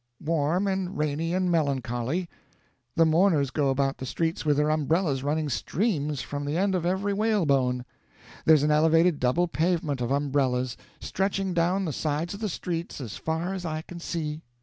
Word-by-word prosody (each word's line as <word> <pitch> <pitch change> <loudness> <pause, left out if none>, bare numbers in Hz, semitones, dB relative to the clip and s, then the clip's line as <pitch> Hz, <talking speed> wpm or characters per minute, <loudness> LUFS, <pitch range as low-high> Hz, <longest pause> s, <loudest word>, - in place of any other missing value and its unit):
"Warm 165 +4 +1
and 190 -1 -2
rainy 150 +2 -1
and 180 0 +1
melancholy. 140 +1 0 0.7
The 165 - +5
mourners 160 -4 +3
go 145 -2 +1
about 135 0 0
the 130 - -4
streets 165 +5 -1
with 150 -2 +2
their 150 +1 +2
umbrellas 155 -1 +1
running 150 +2 0
streams 150 - -1
from 145 0 -4
the 145 +3 -2
end 195 +1 +2
of 175 -2 0
every 195 +2 0
whalebone. 140 - +1 0.6
There's 155 -3 +6
an 150 - +2
elevated 160 +1 +4
double 130 +8 +2
pavement 160 -5 0
of 120 - -1
umbrellas, 135 -3 0 0.2
stretching 195 -1 -1
down 180 +3 +1
the 155 - -2
sides 155 +5 -2
of 200 - -7
the 215 -2 -2
streets 170 -2 -4
as 120 -7 -6
far 160 +4 -2
as 190 -2 -5
I 155 -2 -3
can 175 +1 -9
see. 155 -3 -4
160 Hz, 170 wpm, -27 LUFS, 145-180 Hz, 0.7 s, There's